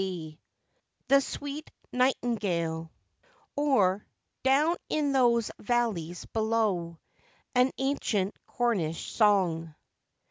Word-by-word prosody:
THE 170 -5 -5 0.8
SWEET 285 +2 -6 0.2
NIGHTINGALE; 195 -11 0 0.7
OR, 210 -10 +2 0.3
DOWN 295 +6 +3
IN 295 -2 +1
THOSE 240 -4 +3
VALLEYS 205 -8 -1
BELOW. 215 -7 0 0.6
AN 250 +1 +4
ANCIENT 240 -8 0
CORNISH 195 -10 -1
SONG. 175 -7 +2
220 Hz, 75 wpm, -29 LUFS, 175-255 Hz, 0.8 s, AN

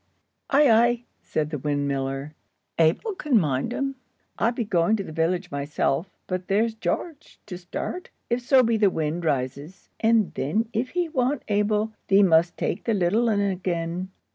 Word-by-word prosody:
"Ay, 290 +1 +5
ay," 235 +1 +4 0.2
said 150 0 -2
the 150 - -3
windmiller, 140 0 -2 0.5
"Abel 165 - +2
can 295 - +2
mind 140 - -1
un. 275 +2 -2 0.5
I 230 - +3
be 240 -1 -3
going 190 +1 +2
to 200 - -3
the 160 - -9
village 175 +3 -1
myself, 145 +4 -1 0.2
but 185 -1 -4
there's 220 +3 +2
Gearge 300 +7 -4
to 190 - -7
start, 180 - -6 0.2
if 240 +1 0
so 255 +1 +5
be 230 -1 +2
the 210 -2 +4
wind 160 0 -2
rises. 140 +4 -3
And 225 -3 +3
then 215 - -1
if 245 +3 -1
he 350 -1 +2
want 265 -3 0
Abel, 210 +1 +1
thee 200 +1 +5
must 170 -1 +3
take - - -2
the 230 - +1
little 205 +6 +2
un 205 -2 +2
again." 180 -2 -2
195 Hz, 165 wpm, -25 LUFS, 160-230 Hz, 0.5 s, Ay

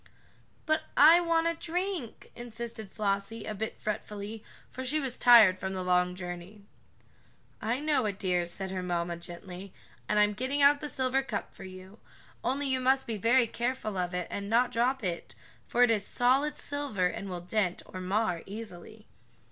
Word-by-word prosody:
"But 310 0 +2 0.2
I 320 +4 +9
want 330 -1 +2
a 335 - +2
drink," 345 - -4
insisted 235 -2 -7
Flossie, 205 +2 -2
a 215 - -4
bit 220 +2 -5
fretfully, 210 0 -5 0.3
for 260 - -6
she 290 +4 +1
was 265 -4 -2
tired 220 -7 +7
from 190 0 -3
the 185 -1 -3
long 180 0 +2
journey. 180 +3 -8 1.0
"I 230 +4 -1
know 295 -5 +1
it, 200 -2 -3
dear," 180 -3 0
said 190 +2 -4
her 185 -1 -3
mamma 175 -1 -2
gently, 180 +2 -9 0.3
"and 210 - +2
I'm 210 0 +4
getting 260 +6 -2
out 285 +1 +6
the 300 - -4
silver 260 0 +1
cup 230 -6 -5
for 190 - -11
you. 185 +3 -11 0.4
Only 275 +2 0
you 260 -1 +1
must 265 +1 +2
be 225 -3 -3
very 235 +4 +4
careful 235 -2 -3
of 180 -1 -2
it, 180 -1 -2
and 200 0 -4
not 240 +3 +3
drop 250 +2 +1
it, 175 -3 -4 0.3
for 245 - +3
it 245 - +5
is 210 -3 +1
solid 260 +7 +2
silver 285 -10 -1
and 195 +2 -3
will 180 -1 -4
dent, 180 0 -1
or 185 - -8
mar, 185 -2 0
easily." 210 0 -9
215 Hz, 180 wpm, -29 LUFS, 185-260 Hz, 1.0 s, I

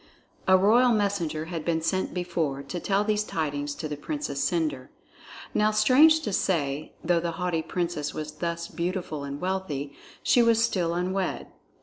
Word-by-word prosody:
A 190 0 +7
royal 230 +6 +5
messenger 195 -8 0
had 165 -1 -5
been 165 -1 +1
sent 185 +3 0
before 165 -6 -2
to 140 +6 -5
tell 200 +3 +1
these 210 0 +1
tidings 145 -5 -3
to 155 - -4
the 150 - -4
Princess 215 - -3
Cendre. 155 -7 -1 0.6
Now, 210 0 +3
strange 265 +9 +5
to 210 - -3
say, 150 -6 -1
though 175 0 +2
the 170 0 -2
haughty 175 -1 -1
Princess 170 -4 -2
was 155 0 -5
thus 170 -1 -3
beautiful 175 -4 -3
and 140 0 -5
wealthy, 170 -7 -3 0.3
she 245 - +5
was 230 -1 +4
still 175 -7 -1
unwed. 185 +2 -2
175 Hz, 160 wpm, -27 LUFS, 155-200 Hz, 0.6 s, A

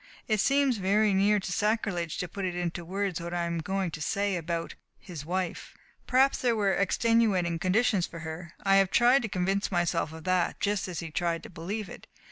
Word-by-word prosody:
It 215 -2 +1
seems 275 +1 +3
very 200 +2 +2
near 205 +2 +3
to 190 - -5
sacrilege 200 -5 -1
to 180 - -3
put 195 +3 -6
into 175 -1 -2
words 190 0 -2
what 170 +1 -5
I 175 - 0
am 170 0 -2
going 190 +1 -2
to 155 - -7
say 200 +5 0
about 170 0 -3 0.2
his 160 -6 -9
wife. 185 0 -3 0.3
Perhaps 265 +2 +3
there 240 -2 +2
were 200 -3 +2
extenuating 200 -4 +2
conditions 190 +1 +2
for 165 - -9
her. 160 +2 -7
I 195 0 +5
have 195 -1 +4
tried 245 +6 +5
to 220 - -4
convince 195 +2 -1
myself 175 -3 0
of 160 0 -10
that, 185 -1 0
just 205 -1 0
as 180 -3 -4
he 165 -1 -7
tried 170 +1 -1
to - - -10
believe 195 +5 -5
it. - - -11
185 Hz, 200 wpm, -28 LUFS, 170-210 Hz, 0.3 s, I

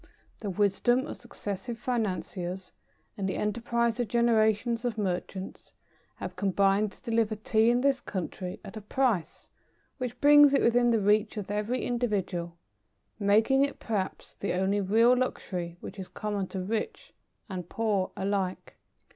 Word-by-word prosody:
The 210 - -4
wisdom 210 +6 +2
of - - -7
successive 225 -1 -6
financiers, 190 -6 -3 0.4
and 195 -1 -2
the - - -2
enterprise 235 +2 0
of 240 - 0
generations 230 0 +2
of 240 -3 -2
merchants, 190 -1 -4 0.4
have - - -6
combined 200 +1 +2
to - - -18
deliver 225 -1 +2
Tea 220 +1 +2
in 245 +1 +3
this 275 -1 +2
country 185 0 -5
at - - -9
a 215 - -6
price 220 -4 -1 0.5
which 250 -1 -4
brings 290 -1 +7
it - - +3
within 240 +1 +4
the 230 - +4
reach 210 +2 +2
of 205 -1 -4
every 210 +5 -1
individual, 195 -8 -2 0.6
making 220 +7 +4
it, 280 - -1
perhaps, 205 -5 -3
the 200 - -1
only 190 +3 +1
real 225 +6 +5
luxury 180 -9 -3
which 210 - -8
is 185 - -6
common 205 -3 -3
to 190 - -4
rich 220 - -4 0.3
and 180 -4 -6
poor 210 -4 0
alike. 195 -1 -2
210 Hz, 145 wpm, -29 LUFS, 195-235 Hz, 0.6 s, brings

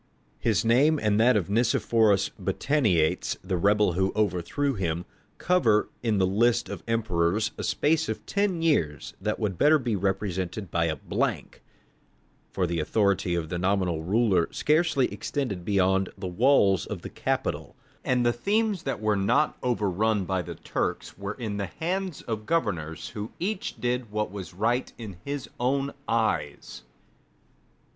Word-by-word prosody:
His 115 -2 +1
name 140 +7 +4
and 105 -2 +1
that 120 +1 +5
of 95 - -1
Nicephorus 110 -1 +2
Botaniates, 105 - +1
the 95 0 -2
rebel 100 +1 +3
who 95 +2 +1
overthrew 110 - 0
him, 85 -5 -2 0.3
cover 120 -13 +2
in 110 -3 +1
the 95 - +3
list 120 +5 +2
of - - -6
emperors 105 -2 +1
a - - -6
space 160 0 +1
of 110 - -4
ten 200 -5 0
years 80 - 0
that 105 +2 -1
would 100 -5 -2
better 150 +2 +6
be 120 -6 -1
represented 95 -1 -2
by 85 -1 +1
a 80 -1 0
blank; 70 - -3 0.9
for 95 - -1
the 85 -1 -2
authority 95 +1 +1
of 80 -2 -3
the 85 - -3
nominal 90 -3 0
ruler 95 0 +2
scarcely 155 -3 +2
extended 105 -2 -3
beyond 95 0 +2
the 95 -1 -5
walls 100 - +3
of - - -6
the - - -5
capital, - - -2 0.3
and 125 -1 +1
the 120 - +3
themes 205 - 0
that 135 -6 -3
were 110 -1 +2
not 100 +10 +2
overrun 105 -3 0
by 95 0 -1
the - - -7
Turks - - -3
were 100 +1 -5
in 110 -5 -4
the 100 -1 -2
hands 180 - -3
of 110 -2 -5
governors 85 - -1
who 105 -1 -6
each 190 +2 -3
did 125 -1 -1
what 105 -2 -2
was 95 -4 -8
right 115 +6 0
in 105 -6 -8
his 140 -2 -4
own 135 +3 0
eyes. 110 - -1
105 Hz, 155 wpm, -26 LUFS, 95-125 Hz, 0.9 s, better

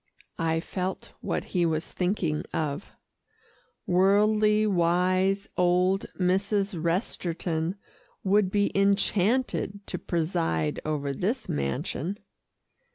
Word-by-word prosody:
I 165 -1 +1
felt 185 +2 -4
what - - -2
he 180 -2 0
was 160 -1 0
thinking 180 -5 -1
of. 150 +2 -2 0.9
Worldly 210 +3 +4
wise 185 +1 +2
old 180 +2 +2
Mrs. 195 +2 +1
Resterton 170 -1 -1 0.5
would 195 0 +3
be 205 +1 +1
enchanted 200 +1 +1
to - - -5
preside 80 - -1
over 145 -2 -2
this 215 - -2
mansion. 75 - -2
185 Hz, 95 wpm, -27 LUFS, 165-200 Hz, 0.9 s, Worldly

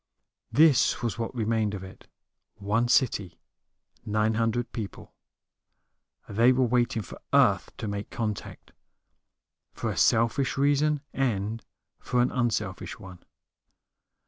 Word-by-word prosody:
This 150 -5 +4
was 120 0 -2
what 115 +3 -4
remained 110 -2 0
of 95 - -7
it: 95 0 -13 0.5
one 105 +4 0
city, 105 -8 +1 0.7
nine 110 0 +1
hundred 115 +2 -1
people. 110 -4 -7 1.1
They 115 +5 +4
were 130 0 +2
waiting 120 -2 +1
for - - -11
Earth - - +4
to 110 - -5
make 100 0 -4
contact, 105 -3 -5 1.0
for - - -3
a - - -6
selfish 115 +5 +2
reason 145 +1 +2
and 115 -4 -1 0.4
for 125 - -1
an 125 - 0
unselfish 110 -6 -2
one. 95 -1 -12
115 Hz, 120 wpm, -27 LUFS, 105-125 Hz, 1.1 s, This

